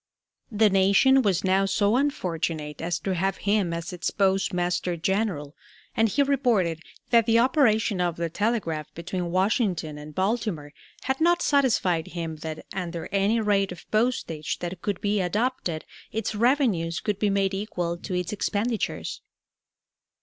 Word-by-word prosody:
The 210 -1 +4
nation 200 +8 +5
was 190 -6 +1
now 190 +1 +3
so 205 +2 +2
unfortunate 165 - -2
as 170 0 -1
to 195 - -1
have 190 +2 0
him 200 -3 +1
as 170 +3 -4
its 180 0 -2
Postmaster 180 -2 0
General, 175 -5 -1 0.4
and 225 0 +3
he 280 +8 +2
reported 235 - +1 0.3
"that 230 -1 +5
the 230 0 +4
operation 230 - +3
of 175 -2 0
the 170 0 -2
telegraph 165 -6 -2
between 175 +1 -4
Washington 185 - 0
and 150 0 -10
Baltimore 190 -7 -1 0.3
had 265 +3 -1
not 345 +1 +3
satisfied 220 - +2
him 165 -2 -5
that, 155 0 -7
under 175 -3 -4
any 200 +3 +2
rate 200 -3 +1
of 180 0 -10
postage 215 -9 0
that 175 0 -6
could 200 -3 -2
be 205 0 +1
adopted, 185 -3 -1 0.3
its 220 0 -2
revenues 215 - +1
could 205 -2 -2
be 210 - +2
made 195 -1 +1
equal 180 -4 -2
to 180 +2 -5
its 180 +2 -2
expenditures." 215 +2 -2
195 Hz, 150 wpm, -26 LUFS, 170-220 Hz, 0.4 s, nation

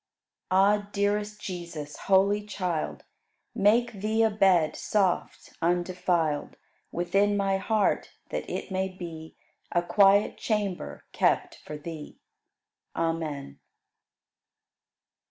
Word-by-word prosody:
101. 200 +2 +4
Ah! - - -25
dearest 205 +1 0
Jesus, 170 -5 -6
holy 200 +2 +4
Child, 180 -6 -3 0.5
Make 230 +2 +3
Thee 215 +3 +1
a 220 - +3
bed, 185 -7 +3
soft, 195 -4 -1
undefiled, 175 -3 0 0.4
Within 195 +4 +1
my 195 -1 +1
heart, 210 +2 +1 0.2
that - - -3
it - - -4
may 190 0 0
be 165 -4 -9 0.4
A 175 - +2
quiet 195 +3 +4
chamber 205 -5 -2
kept - - +1
for 150 - -7
Thee. 155 0 -8 0.8
Amen. 155 - -3
190 Hz, 100 wpm, -27 LUFS, 170-205 Hz, 0.8 s, 101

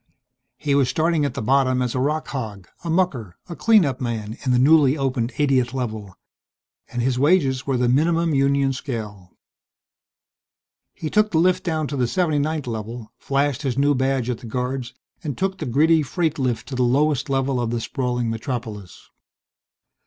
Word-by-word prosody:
He 145 -2 -1
was 140 -3 +3
starting 160 -2 +1
at 140 - -3
the - - -3
bottom 130 +1 +2
as 125 -2 -1
a 130 - -1
rock 150 +4 -1
hog, 105 -9 -5 0.2
a 170 - -4
mucker, 145 - 0
a 170 - -7
clean 220 -3 +4
up 135 -1 -3
man 110 -3 -3
in 130 - 0
the 125 - +4
newly 145 +1 +5
opened 130 -3 -1
80th 135 -3 +1
Level. 110 -7 -4 0.7
And 120 - -3
his 125 0 0
wages 140 -4 +2
were 135 -2 +1
the 125 0 +1
minimum 165 +5 +2
union 140 0 +2
scale. 105 -9 -7 1.6
He 155 - -5
took 215 0 +3
the 165 - 0
lift 185 +2 +3
down 160 -3 -1
to 145 - -4
the 125 -2 +1
79th 155 0 0
Level, 115 0 -6
flashed 140 -1 0
his 135 -4 -2
new 145 +1 +3
badge 130 -2 0
at 125 -3 -2
the 120 - -10
guards, 125 +1 -3 0.3
and 145 -5 -4
took 190 0 -1
the - - -4
gritty 155 +6 +4
freight 160 +1 -1
lift 125 -4 -1
to 135 - -4
the 125 - -1
lowest 140 +3 +2
level 135 -1 0
of 120 - -1
the 120 0 -1
sprawling 125 0 -2
metropolis.... 115 -4 -5
135 Hz, 180 wpm, -22 LUFS, 120-150 Hz, 1.6 s, newly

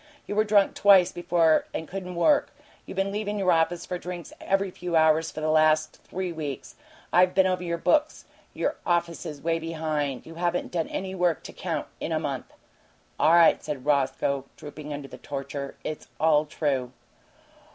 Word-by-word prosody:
You - - -4
were 215 +1 +3
drunk 205 -2 +3
twice 195 -3 +6
before 170 -2 +2
and 160 - -4
couldn't 180 -1 -6
work. 285 - +3 0.4
You - - -7
been 195 +1 0
leavin' 210 0 -2
your 190 -2 +2
office 170 +1 +1
for 180 - -4
drinks 175 -2 -7
every 195 -1 0
few 175 -1 -4
hours 160 0 +4
for 155 - -7
the 155 0 +1
last 155 0 +3
three 185 -1 -4
weeks. 145 -6 -6 0.4
I 180 +1 +6
been 190 +1 +3
over 185 -1 0
your 170 -1 -2
books. 305 - +1 0.3
Your - - -1
office 170 -1 -1
is 150 -2 -8
way 165 0 +1
behind. 155 -4 -3
You 165 - -10
haven't 175 0 -1
done 165 -2 -1
any 190 0 -4
work, 175 -4 0
to - - -9
count, - - -3
in - - -4
a - - +1
month." - - -4 0.7
"All 160 - +5
right," 170 -1 +6
said 140 -3 -5
Roscoe, 140 -1 +1
drooping 150 0 -9
under 145 -1 -5
the - - -11
torture. 140 0 -5
"It's 155 - -5
all 155 -1 +4
true." 135 -5 -1
165 Hz, 185 wpm, -26 LUFS, 150-180 Hz, 0.7 s, twice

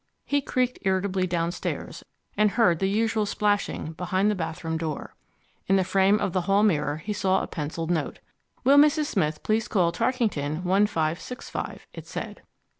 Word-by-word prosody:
He 285 0 +1
creaked 255 -2 -1
irritably 190 -1 0
downstairs, 170 0 -3 0.3
and 210 0 +4
heard 195 -7 +3
the 190 - +1
usual 220 0 +1
splashing 205 -6 0
behind 185 +5 0
the - - +1
bathroom 160 -1 -4
door. 160 -2 -4 0.5
In 195 - +4
the 190 - +3
frame 195 +3 +3
of 200 -4 -1
the 185 - +1
hall 195 +3 +2
mirror 150 -7 +1
he 210 +7 -4
saw 190 -2 +1
a - - -4
pencilled 165 +1 -4
note: 160 -4 -1 0.5
Will 275 +3 +6
Mrs. 300 +1 +4
Smith 155 - -1
please 220 +1 +1
call 175 -5 +2
Tarkington 170 - -1
1565, 185 +2 -1
it - - -10
said. - - -6
190 Hz, 160 wpm, -26 LUFS, 165-210 Hz, 0.5 s, Will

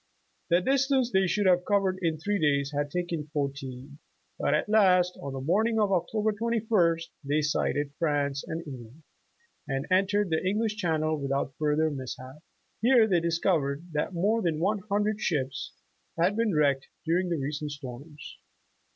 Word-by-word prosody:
' - - -44
' - - -44
The 175 +1 +4
distance 265 +2 +2
they 190 0 +3
should 205 +3 0
have 180 -1 +4
covered 195 -2 +1
in 165 -3 0
three 205 +6 -1
days 140 -2 +1
had 145 0 -1
taken 170 -2 -3
fourteen, 140 -2 -5 0.4
but - - +2
at - - 0
last 185 -4 +4
on 140 -1 -5
the 135 - -4
morning 220 - +1
of 205 -2 +2
Oc 175 -3 +1
tober 215 0 +1
21st 205 -7 +1
they 145 +2 0
sighted 145 -1 0
France 145 -3 0
and 165 +1 -5
England, 130 +1 -10 0.6
and 135 0 -2
en 190 +1 +4
tered 205 -1 +1
the 160 - +1
English 210 +3 0
Channel 155 -5 0
without 140 -1 -1
further 155 +1 +2
mishap. 130 0 -7 0.4
Here 240 -1 +5
they 180 -5 +3
discovered 165 -2 0
that 150 +4 -1
more 205 +6 +1
than 165 -5 0
one 200 +5 +1
hundred 210 +1 0
ships 135 -5 -2 0.5
had 180 +5 +3
been 225 -5 +1
wrecked 140 -2 +2 0.2
during 175 +3 +1
the 170 - 0
recent 145 +2 -3
storms. 145 +1 -9
165 Hz, 170 wpm, -28 LUFS, 145-200 Hz, 0.6 s, Here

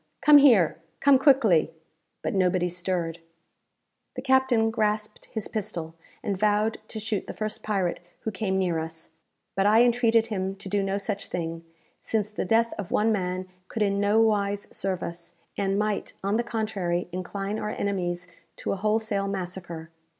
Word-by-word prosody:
Come 300 -1 +8
here! 220 - +5 0.2
Come 275 -2 +5
quickly!" 245 - +5 0.5
But - - -1
nobody 180 -2 +2
stirred. 175 -1 -2 1.0
The 255 - -5
captain 260 -4 +3
grasped 215 -1 -1
his 220 -3 -4
pistol, 170 -6 -4 0.3
and 200 - -1
vowed 210 +2 +1
to 220 - -5
shoot 215 -2 -3
the - - -6
first 215 0 -3
pirate 195 -5 -1 0.2
who 220 - -3
came 190 -1 -1
near 180 -4 +1
us; 160 +1 -6 0.4
but 195 +1 +3
I 220 +3 +6
entreated 230 -2 +3
him 195 -3 -3
to 195 0 -9
do 200 +1 +1
no 195 0 -1
such 200 0 -3
thing, 165 -1 -4 0.4
since 215 -1 -1
the 210 - -3
death 230 +3 +2
of 195 - -4
one 220 +2 +2
man 185 -2 -1 0.2
could 220 - -1
in 200 -1 +1
nowise 205 -1 +2
serve 190 -2 -1
us, 170 0 -7 0.2
and 195 0 0
might, 210 0 -1
on 200 +2 +1
the 235 - +1
contrary, 210 -7 -2
incline 195 +3 -3
our 210 - -3
enemies 180 -4 -2 0.3
to - - -3
a - - -3
wholesale 210 -1 0
massacre. 175 -4 -5
200 Hz, 165 wpm, -26 LUFS, 185-220 Hz, 1.0 s, Come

